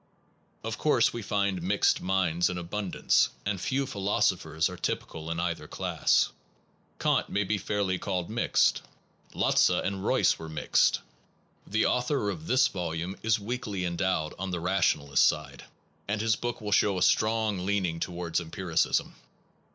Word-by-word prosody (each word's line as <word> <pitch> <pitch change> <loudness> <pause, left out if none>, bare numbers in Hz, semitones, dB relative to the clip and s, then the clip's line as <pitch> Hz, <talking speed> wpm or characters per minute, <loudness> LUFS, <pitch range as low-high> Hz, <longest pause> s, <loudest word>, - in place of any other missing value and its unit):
Of - - -4
course - - +3
we 120 - -4
find 100 -2 -1
mixed 100 +4 +2
minds 90 -2 +1
in 90 - -4
abundance, 90 +2 +1 0.2
and 100 -3 -2
few 135 +5 0
philosophers 90 - 0
are 90 - -7
typical 80 -2 -4
in 85 0 -2
either 85 -3 -2
class. - - +1 0.7
Kant - - +1
may 100 +1 0
fairly 100 0 -1
be 90 - -2
called 90 -4 -2
mixed. 115 +2 +2 0.5
Lotze - - +4
and 95 -1 -1
Royce - - +2
are 80 -1 -7
mixed. 80 -1 +2 0.7
The 110 +2 +1
author 125 -4 +1
of 80 -4 -8
this 130 +1 +4
volume 85 -1 -4
is 110 0 +2
weakly 105 -4 -3
endowed 85 -3 -1
on 95 0 -3
the 90 -2 -2
rationalist 80 -6 +2
side, - - -3 0.4
and 105 +1 -1
his 110 0 +2
book 120 0 -4
will 105 -1 -4
show 100 -1 +3
a 90 - +2
strong 110 -4 +2
leaning 95 -4 0
towards 85 -1 -2
empiricism. 85 0 -1
95 Hz, 150 wpm, -28 LUFS, 85-105 Hz, 0.7 s, Lotze